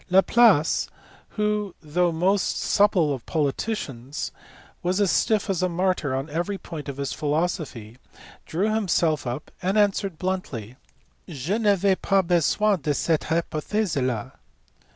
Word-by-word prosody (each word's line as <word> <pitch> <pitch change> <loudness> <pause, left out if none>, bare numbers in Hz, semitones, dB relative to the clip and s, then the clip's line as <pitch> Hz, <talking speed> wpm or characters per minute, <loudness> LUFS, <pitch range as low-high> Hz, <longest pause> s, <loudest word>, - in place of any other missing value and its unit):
Laplace, 190 -2 +4 0.5
who, 210 -2 0
though 175 +3 0
the 160 - -6
most 190 +3 +1
supple 190 -8 +3
of 130 -4 -6
politicians, 145 - -2 0.5
was 185 +3 0
as 200 -3 +3
stiff 215 -2 +2
as 190 -4 0
a 185 - +1
martyr 175 -6 0
on 135 +2 -3
every 175 +6 -2
point 155 -6 -8
of 140 - -6
his 140 -1 -3
philosophy, 150 - -2 0.5
drew 200 +7 0
himself 170 - +1
up 120 +6 -5
and 190 +3 0
answered 200 -4 +1
bluntly, 150 - -4 0.5
"Je 155 +3 -3
n 225 +1 -1
avais 200 -1 +4
pas 195 -1 +3
besoin 180 +3 +2
de 150 -1 0
cette 160 +1 0
hypothese 170 +4 -1
la. 120 -5 -2
175 Hz, 140 wpm, -24 LUFS, 150-200 Hz, 0.5 s, Laplace